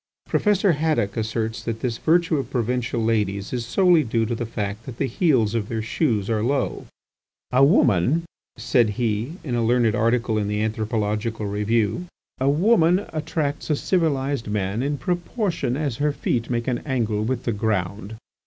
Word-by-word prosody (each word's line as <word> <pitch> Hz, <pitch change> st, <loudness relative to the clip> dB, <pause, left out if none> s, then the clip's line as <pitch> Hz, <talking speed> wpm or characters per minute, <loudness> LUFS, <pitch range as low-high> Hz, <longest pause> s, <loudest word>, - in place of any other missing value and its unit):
Professor 205 Hz, -2 st, +2 dB
Haddock 145 Hz, -10 st, 0 dB
asserts 110 Hz, 0 st, -2 dB
that 115 Hz, -1 st, -4 dB
this 120 Hz, -3 st, -2 dB
virtue 165 Hz, 0 st, +2 dB
of 135 Hz, -, -3 dB
provincial 125 Hz, 0 st, -1 dB
ladies 105 Hz, -3 st, 0 dB
is 120 Hz, -2 st, -3 dB
solely 180 Hz, +2 st, +4 dB
due 115 Hz, -2 st, 0 dB
to 115 Hz, -, -2 dB
the 120 Hz, 0 st, -3 dB
fact 105 Hz, -1 st, -4 dB
that 125 Hz, -3 st, -7 dB
the -, -, 0 dB
heels 130 Hz, -, +2 dB
of 110 Hz, -3 st, -2 dB
their 110 Hz, -1 st, -2 dB
shoes 110 Hz, -, 0 dB
are 110 Hz, -2 st, 0 dB
low. 135 Hz, +5 st, -1 dB, 0.6 s
"A 130 Hz, +2 st, +4 dB
woman," 140 Hz, -, +3 dB, 0.3 s
said 120 Hz, 0 st, +2 dB
he, 115 Hz, +3 st, -1 dB
in 130 Hz, -, -4 dB
a 120 Hz, -1 st, +1 dB
learned 115 Hz, -1 st, +3 dB
article 115 Hz, -1 st, +1 dB
in 105 Hz, -, -1 dB
the 105 Hz, 0 st, -1 dB
"Anthropological 110 Hz, 0 st, -2 dB
Review", 105 Hz, -, 0 dB, 0.3 s
"a 135 Hz, +1 st, +2 dB
woman 180 Hz, +3 st, +3 dB
attracts 155 Hz, -2 st, -2 dB
a 150 Hz, -, +3 dB
civilized 140 Hz, -7 st, 0 dB
man 105 Hz, +1 st, -1 dB
in 145 Hz, +2 st, -1 dB
proportion 175 Hz, -, -2 dB
as 145 Hz, -6 st, -2 dB
her 150 Hz, +1 st, +1 dB
feet 120 Hz, -4 st, -2 dB
make 120 Hz, 0 st, -1 dB
an 125 Hz, -2 st, 0 dB
angle 115 Hz, -6 st, -1 dB
with 125 Hz, +2 st, -2 dB
the 115 Hz, -, -1 dB
ground. 100 Hz, 0 st, -2 dB
120 Hz, 170 wpm, -23 LUFS, 110-145 Hz, 0.6 s, solely